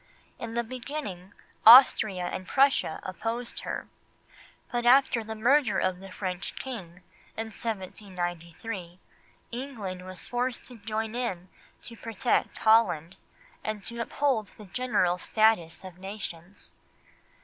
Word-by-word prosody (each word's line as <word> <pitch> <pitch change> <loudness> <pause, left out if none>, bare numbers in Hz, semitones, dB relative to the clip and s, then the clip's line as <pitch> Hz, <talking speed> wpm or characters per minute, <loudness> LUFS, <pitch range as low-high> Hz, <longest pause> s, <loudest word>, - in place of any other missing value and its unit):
In 230 0 -6
the 235 - +1
beginning 230 -6 -6 0.3
Austria 220 -5 +8
and 185 +1 -4
Prussia 270 - +3
opposed 225 +6 -4
her, - - -5 0.8
but 240 0 -1
after 245 -1 +5
the 220 0 -6
murder 245 +2 +3
of 180 -1 0
the 195 0 -11
French 185 -1 -4
King, 185 -9 -7 0.3
in 220 0 -4
January 215 -2 -3
1793, 175 0 -6 0.5
England 230 -8 -5
was 185 -1 -8
forced 245 0 -2
to 245 -3 -10
join 220 +1 -3
in 190 -8 -3 0.3
to 235 - -10
protect 230 +2 0
Holland, 190 -7 +3 0.5
and 215 -2 -3
to 235 +2 -5
uphold 245 -3 0
the 210 - -11
general 190 -4 +1
status 215 -8 +2
of 185 -1 -10
nations. 190 -2 -8
215 Hz, 125 wpm, -28 LUFS, 185-235 Hz, 0.8 s, Austria